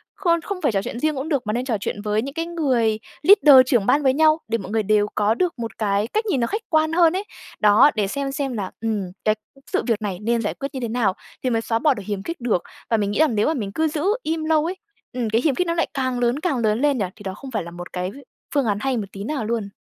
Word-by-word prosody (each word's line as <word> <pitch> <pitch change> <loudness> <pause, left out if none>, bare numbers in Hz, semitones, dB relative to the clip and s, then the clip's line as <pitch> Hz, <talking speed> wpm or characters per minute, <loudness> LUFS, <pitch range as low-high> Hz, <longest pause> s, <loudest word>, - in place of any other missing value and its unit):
khôn 340 -4 +1
không 375 +2 -5
phải - - +2
trò 195 -2 0
chuyện 235 - -5
riêng 310 +1 0
cũng 275 +4 -4
được, 275 -8 -1
mà 210 - 0
nên 245 +2 -1
trò 235 -5 0
chuyện 205 +1 -4
với 210 0 0
những 275 +3 -6
cái 330 +1 -2
người 255 -10 +1 0.2
leader, 300 -7 +8
trưởng 245 -6 +2
ban 290 +7 +3
với 265 -1 +4
nhau, 310 +2 +4
để 230 +1 0
mọi 195 -2 -8
người 220 0 +1
đều 210 0 +3
có 210 +1 +2
được 340 +2 -1
một 230 -1 -5
cái 205 0 0
cách 435 - -1
nhìn 375 -11 0
nó 235 - +1
khách 425 - -2
quan 315 -1 +2
hơn 335 -1 +5
ấy. 385 - -1 0.4
Đó, 210 +7 +6
để 210 -3 +1
xem 275 +5 -3
xem 270 -1 -2
là, 200 -5 -4
ừm, 220 -3 -1 0.2
cái 215 0 +3 0.4
sự - - +1
việc 225 -2 +1
này 195 -4 -3
nên 230 +2 +1
giải 210 - -2
quyết 275 - -5
như 265 - -4
thế 240 - -2
nào 220 -4 +1 0.3
thì 255 - +1
mới 225 -1 +1
xóa 225 0 -1
bỏ 295 +3 +3
được 210 -5 -7
hiềm 200 -1 -3
khích 335 +1 -6
được. 220 -8 0 0.3
Và 225 - +3
mình 205 -1 0
nghĩ 205 - -2
rằng 305 -7 +3
nếu 210 - +2
mà 315 - +2
mình 210 -9 -4
cứ 315 +8 +1
giữ 300 0 -3 0.2
im 320 0 -2
lâu 315 -1 +2
ấy 355 +3 -2 0.4
ừm, 245 -3 -2
cái 225 +2 +2
hiềm 285 -2 +1
khích 360 - 0
nó 335 - +1
lại 335 0 0
càng 260 -2 -1
lớn, 245 +3 +1
càng 315 -5 0
lớn 220 -1 +1
lên 290 -2 +2
nhỉ? 205 - 0
Thì 205 - -13
đó 190 -1 -4
không 270 +6 -10
phải 215 -6 -2
là 170 - -9
một 175 +1 -9
cái 180 +1 -3 0.4
phương 280 -3 +2
án 205 -2 +1
hay 265 -2 0
một 215 - -2
tí 195 - -7
nào 270 -1 -3
luôn. 220 -2 -2
245 Hz, 295 wpm, -22 LUFS, 215-300 Hz, 0.4 s, leader